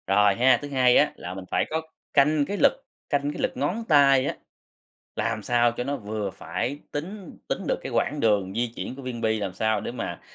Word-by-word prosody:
Rồi 100 +1 +4
ha, 125 +2 +5
thứ 145 - -5
hai 130 -3 +4
á 150 - +4
là 90 - -7
mình 95 0 -8
phải - - +2
có 160 +1 -1 0.3
canh 145 +1 +4
cái 205 - -3
lực, - - +5 0.4
canh 145 0 0
cái - - -5
lực - - +1
ngón 175 - -1
tay 140 -4 +5
á, - - -2 0.8
làm 115 -1 -1
sao 120 +1 +3
cho 125 - -4
nó 140 +2 -2
vừa 105 -2 -4
phải. 90 - -4
Tính 185 +5 -6
tính - - -1
được - - +2
cái - - -6
quãng 150 - 0
đường 100 -5 +2
di 120 0 -1
chuyển 130 - -5
của 140 - -9
viên 125 -2 -5
bi, 110 -1 +1
làm 100 -3 -3
sao 110 0 +1
để - - -5
mà 120 -2 -5
125 Hz, 225 wpm, -25 LUFS, 110-145 Hz, 0.8 s, ha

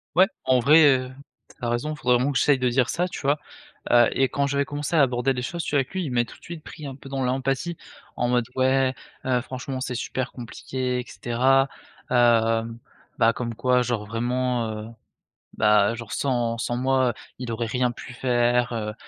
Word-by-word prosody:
Ouais 185 +2 +6 0.2
en 130 -1 +4
vrai, 150 +4 +7
heu, 130 -2 +3 0.4
tu - - -18
as - - 0
raison! 120 +6 -1
Faudrait 125 -4 +2
vraiment 130 +4 +1
que 135 - 0
j'essaye 145 -2 +4
de 125 -1 +1
dire 125 0 +2
ça 175 +1 0
tu - - -7
vois? 145 +2 +1 0.5
Heu 120 -1 +6
et 135 -1 +3
quand 140 0 0
j'avais 140 0 +1
commencé 145 +3 -3
à 150 - +6
aborder 130 0 +2
les 125 - -3
choses, 170 +7 -4
tu - - -3
vois? 145 - +3
Avec 135 - -3
lui. 185 -3 -2
Il 135 - -4
m'a 120 -1 +2
tout - - -13
de - - -40
suite 170 -2 -9
pris 150 - -10
un 135 - -7
peu 135 0 -12
dans 135 -1 -3
l'empathie, 135 +6 -1 0.4
en 120 0 0
mode: 120 -1 +2
«Ouais, 130 0 +2 0.3
heu, 125 -2 +1
franchement 130 +1 -6
c'est 130 - -3
super 130 +2 -3
compliqué 125 +1 -4
et - - -8
cetera, 130 +3 +2 0.4
heu» 115 -2 +4 0.5
bah, 115 0 +4
comme 115 -2 -4
quoi 125 +1 +2
genre 120 -4 -2
vraiment, 120 +1 -1
heu, 110 0 -6 0.7
bah 105 0 +4
genre 115 -2 -8
sans 120 -4 0
sans 120 +1 -2
moi, 130 -2 +2 0.2
il 125 -2 -5
aurait 115 +1 -2
rien 125 +2 0
pu 125 - -10
faire, 120 -1 +1
heu, 105 -2 -3
125 Hz, 210 wpm, -24 LUFS, 120-135 Hz, 0.7 s, vrai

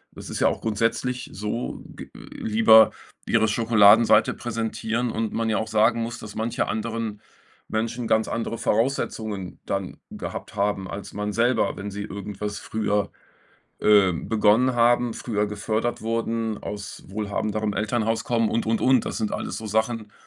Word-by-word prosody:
es - - -9
ist - - -4
ja - - +5
auch - - -3
grundsätzlich 115 +4 -1
so, 105 +4 -4
g - - -10
lieber 110 0 +4 0.3
ihre 110 -1 +3
Schokoladenseite 110 0 +5
präsentieren 115 0 -2
und 110 -1 -2
man 115 0 0
ja 110 - +1
auch 110 - -2
sagen 110 +2 +3
muss, 115 +1 -4
dass 105 -1 -9
manche 115 +3 -1
anderen 110 -1 -3 0.5
Menschen 115 +2 -2
ganz 110 0 +2
andere 115 0 -3
Voraussetzungen 110 -6 -1
dann 95 -2 -3
gehabt - - -7
haben, 100 -2 -1
als 100 - -7
man 105 0 -3
selber. 120 +4 +1
Wenn 100 +1 -5
sie 100 +1 -5
irgendwas 100 0 -5
früher, 105 -1 -1 0.7
äh, 100 -3 +5
begonnen 110 +7 +2
haben, 120 0 +3
früher 105 -3 -1
gefördert 110 +3 -2
wurden, 115 -1 -1
aus 105 -1 -7
wohlhabenderem 105 +1 -2
Elternhaus 110 +2 0
kommen 115 -2 +1
und 115 - -1
und 115 0 +1
und. 130 -2 +4
Das - - -4
sind 110 -2 -2
alles - - -3
so 110 - -6
Sachen, 110 0 -1
110 Hz, 155 wpm, -24 LUFS, 105-115 Hz, 0.7 s, ja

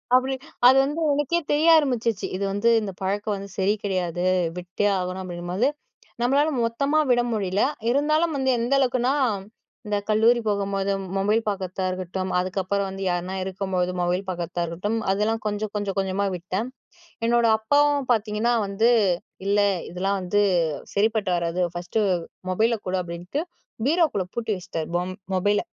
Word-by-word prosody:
அப்பிடி, 260 +1 +2 0.3
அது 260 +1 +7
வந்து 295 +4 -2
எனக்கே 295 +4 +1
தெரிய 305 +3 +3
ஆரம்பிச்சிச்சு. 235 -8 0
இது 200 - -3
வந்து 205 +4 +2
இந்த 200 -2 -4
பழக்கம் 205 +2 -1
வந்து 200 0 -7
சரி 195 +2 +3
கிடையாது, 180 -3 -1 0.3
விட்டே 180 +3 -2
ஆகணும் 185 +1 -3
அப்பிடிங்கம்போது, 180 +6 -1 0.5
நம்மளால 280 +5 +3 0.2
மொத்தமா 280 +7 +1
விட 240 0 +4
முடியல, 195 -1 0 0.3
இருந்தாலும் 305 +3 +2
வந்து 265 0 0
எந்த 240 +4 0
அளவுக்குனா, 255 0 +2 0.7
இந்த 205 0 0
கல்லூரி 225 +3 +4
போகும்போது, 200 -1 -1 0.3
மொபைல் 210 +4 +2
பார்க்கிறதா 190 -1 -3
இருக்கட்டும், 185 +1 -4
அதுக்கப்பறம் 195 +2 -1
வந்து 195 0 -6
யார்னா 180 +2 -2
இருக்கும்போது 185 -1 -1
மொபைல் 180 +2 0
பார்க்கிறதா 175 -1 -3
இருக்கட்டும், 205 +7 -2
அதெல்லாம் 220 +3 0
கொஞ்சம், 210 0 -2
கொஞ்சம், 200 -1 -3
கொஞ்சமா 195 +1 0
விட்டேன். 185 +7 -3 0.6
என்னோட 235 0 +3
அப்பாவும் 285 +3 +2
பார்த்தீங்கன்னா 220 +2 +1
வந்து, 220 +5 +2 0.6
இல்ல 205 +1 +2 0.3
இதெல்லாம் 195 +3 -1
வந்து 205 +3 +1 0.5
சரிப்பட்டு 210 -2 +1
வராது. 170 +1 -1
ஃபர்ஸ்ட்டு 180 +5 -1 0.5
மொபைல 225 +5 +2
கொடு 185 +1 0
அப்பிடின்ட்டு, 175 - -4 0.4
பீரோக்குள்ள 310 - +2
பூட்டி 230 -2 -3
வச்சிட்டாரு. 165 -3 -5
பொம் 180 +1 -2 0.2
மொபைல. 205 +2 +2
205 Hz, 140 wpm, -24 LUFS, 185-235 Hz, 0.7 s, அது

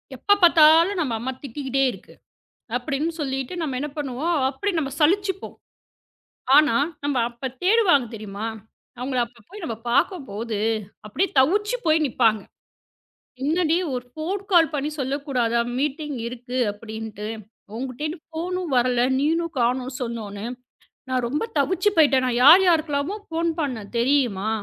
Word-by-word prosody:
"எப்பப் 405 +9 +2
பாத்தாலும் 335 +3 +6
நம்ம 255 -7 -1
அம்மா 260 +3 -3
திட்டிக்கிட்டே 270 +1 -2
இருக்கு!" - - -14 0.6
அப்படின்னு 285 +6 -2
சொல்லிட்டு 270 +2 -3
நாம 275 -6 -2
என்ன 295 - -3
பண்ணுவோம், 290 +5 -1 0.2
அப்படி 405 +10 -2
நாம 275 -3 -2
சலிச்சுப்போம். 385 +4 +1 1.0
ஆனா, 295 -6 +5 0.3
நாம 280 -4 +1
அப்ப 240 +2 -5
தேடுவாங்க 365 - +4
தெரியுமா, 210 0 -6 0.5
அவங்கள 255 0 -2
அப்ப 235 -2 -21
போய் 405 -1 -10
நாம 225 -5 -4
பாக்கும்போது, 230 - -1 0.5
அப்படியே 350 - 0
தவிச்சுப் 415 - +2
போய் 315 0 +3
நிப்பாங்க. 225 -5 +2 1.0
"என்னடி, 325 +2 +2 0.2
ஒரு 245 -1 -4
ஃபோன் 365 +6 -3
கால் 330 -4 +5
பண்ணி 290 +1 -1
சொல்லக்கூடாதா 260 -4 0 0.2
மீட்டிங் 295 -1 -2
இருக்கு 245 +1 -6
அப்படின்னு. 220 0 -7 0.5
உன்கிட்டயும் 295 +6 -5
ஃபோனும் 345 0 -4
வரல, 245 0 +2 0.2
நீனும் 330 +3 0
காணோம் 250 +2 0
சொன்னொன்னே. 215 -4 -5 0.7
நான் 255 -1 0
ரொம்ப 295 - -2
தவிச்சுப் 370 +7 +1
போயிட்டேன். 280 -5 +4
நான் 245 -1 0
யார் 340 +7 +9
யாருக்குல்லாமோ 315 +1 +1
ஃபோன் 330 +1 -1
பண்ணேன் 245 -9 -3
தெரியுமா? 235 -6 +1
280 Hz, 130 wpm, -23 LUFS, 245-330 Hz, 1.0 s, யார்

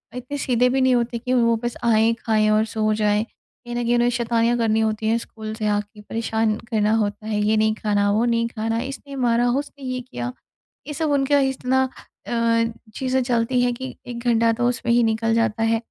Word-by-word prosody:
इतने 250 +3 -5
सीधे 250 -2 +2
भी 265 +1 +1
नहीं 260 0 +4
होते 235 0 0
की 250 +2 -2
वो 230 -2 +3
बस 240 0 -2
आएँ, 225 -1 +4
खाएँ 215 -2 +2
और 215 +1 +3
सो 215 -1 0
जाएँ, 210 0 +1
कहीं 240 +1 -12
न 240 - -1
कहीं 240 +1 +2
उन्हें 240 0 +3
शैतानियाँ 235 0 +1
करनी 220 -2 +1
होती 220 0 0
हैं 225 +1 +3
स्कूल 220 -2 -7
से 220 -1 -3
आके, 210 0 -2
परेशान 220 0 -1
करना 215 -2 +1
होता 210 -1 -2
है। 215 -1 -1
ये 215 +1 +2
नहीं 215 0 +3
खाना, 205 -1 +1
वो 220 +3 +2
नहीं 230 -1 +1
खाना, 225 0 -2
इसने 275 +1 -7
मारा, 245 -2 +2
उसने 280 +2 -3
ये 255 0 -2
किया, 250 0 -5 0.6
ये 295 - -4
सब 315 +1 -1
उनका 285 0 +3
इतना 265 -1 +1 0.4
अ, - - -5 0.6
चीज़ें 260 0 0
चलती 245 0 +1
हैं 245 0 +2
कि 260 +2 -6 0.2
1 235 -1 -6
घंटा 230 -1 +3
तो 240 +1 0
उसमें 240 -1 -2
ही 240 0 +4
निकल 225 0 +1
जाता 225 -1 +1
है। 225 0 +2
230 Hz, 210 wpm, -22 LUFS, 220-245 Hz, 0.6 s, नहीं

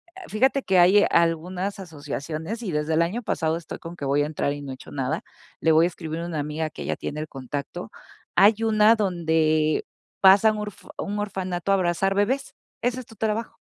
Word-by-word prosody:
Ah, 380 - -10
fíjate 265 +5 +2
que 190 -2 +3
hay 190 +4 +6
algunas 180 +4 +1
asociaciones 160 - -5
y 195 - -3
desde 150 +1 0
el 165 - +4
año 195 +9 -2
pasado 160 -7 -1
estoy 170 -1 -8
con 165 +1 -9
que 160 - -9
voy 140 +2 +2
a - - 0
entrar 150 -1 -1
y 145 0 -7
no 135 - -6
he - - -4
hecho 130 - -12
nada. 140 +3 -2 0.4
Le 160 - +3
voy 160 +1 +5
a - - +3
escribir 165 -1 -6
a - - -4
una 165 -3 -3
amiga 150 +2 -3
que - - -10
ella - - -2
tiene 150 - -5
el 155 - -4
contacto. 135 +1 -6 0.4
Hay 215 +3 +5
una 220 0 +5
donde 160 -6 +1 0.3
pasan 200 +3 +6
urf 210 -2 -7
un 205 +1 -3
orfanato 190 -2 -2
a - - +6
abrazar 190 +1 +1
bebés. 255 +7 0 0.3
Ese 245 +1 0
es - - -14
tu 230 - -15
trabajo. 220 +2 -2
175 Hz, 210 wpm, -24 LUFS, 155-210 Hz, 0.4 s, hay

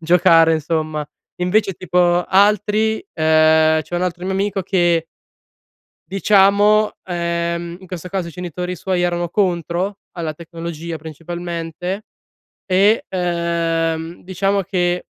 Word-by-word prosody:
giocare, 165 -1 +5
insomma. 155 -1 -2 0.3
Invece 195 +1 +1
tipo, 175 0 +2
altri 210 - +2
ehm, 155 0 +4
c'è 175 - -8
un 175 - 0
altro 180 0 -3
mio 190 - -1
amico 195 0 -1
che 175 -3 +1 1.0
diciamo, 205 +2 +3
ehm, 170 -1 -2
in 185 - -14
questo 180 0 -7
caso 185 -2 -2
i 170 - -8
genitori 180 +1 -5
suoi 180 +1 -1
erano 175 -1 -1
contro 180 +1 -1
alla 165 -3 -4
tecnologia 165 0 -7
principalmente. 170 +4 -5 0.6
E, 200 +3 +3
ehm, 170 -2 -1
diciamo 195 +2 0
che, 175 -1 -1
175 Hz, 115 wpm, -19 LUFS, 165-190 Hz, 1.0 s, giocare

